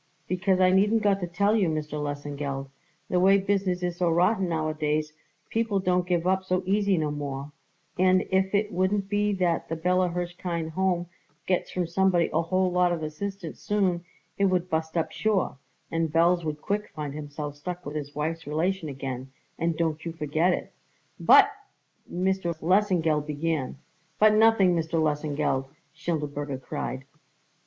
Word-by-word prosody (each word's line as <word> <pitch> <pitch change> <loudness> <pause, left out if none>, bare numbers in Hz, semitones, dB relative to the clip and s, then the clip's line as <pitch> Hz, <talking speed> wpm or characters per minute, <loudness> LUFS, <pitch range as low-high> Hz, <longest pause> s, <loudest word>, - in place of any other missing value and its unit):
Because 185 +1 +1
I 185 0 +5
needn't 210 +4 +3
got 200 -1 +3
to 175 - -3
tell 200 +5 +2
you, 195 -6 +2
Mr. 150 -1 -3
Lesengeld, 145 -1 -4 0.4
the 180 - +1
way 195 +2 +6
business 195 -2 0
is 175 -1 -2
so 175 -1 +2
rotten 180 +3 +2
nowadays 155 -1 -1 0.4
people 225 -3 +1
don't 180 -1 +1
give 175 -2 +1
up 190 +1 +2
so 185 0 0
easy 200 0 +2
no 155 -2 0
more; 140 -1 -5 0.5
and 185 0 +4
if 190 +1 +2
it 210 +1 +1
wouldn't 195 +1 0
be 205 0 +1
that 180 -3 0
the 165 - -1
Bella 180 +2 +2
Hirshkind 175 -1 -3
Home 180 0 0 0.4
gets 180 -1 0
from 180 -1 -1
somebody 175 0 +2
a 160 - +3
whole 185 +2 +1
lot 180 0 +3
of 165 -2 -2
assistance 170 +3 -5
soon 190 -4 0 0.4
it 200 - +4
would 180 -2 +1
bust 160 +1 -1
up 165 - 0
sure, 205 -10 0 0.3
and 165 -1 0
Belz 170 +2 +3
would 150 -1 -4
quick 210 +1 -2
find 150 -2 -4
himself 145 0 -6
stuck 180 +4 -6
with 150 - -6
his 145 -1 -5
wife's 160 +2 -3
relation 165 +2 -1
again, 135 -1 -5 0.3
and 165 -1 0
don't 160 -2 -1
you 165 - -4
forget 160 +3 +1
it." - - -3 0.5
"But 420 - +7 0.3
" - - -26
Lesengeld 175 -3 +1
began. 150 -2 -2 0.4
"But 215 0 +6
nothing, 215 -4 +5
Mr. 165 0 0
Lesengeld!" 150 -3 0 0.3
Schindelberger 145 -4 -3
cried. 130 0 -5
175 Hz, 165 wpm, -27 LUFS, 155-190 Hz, 0.5 s, But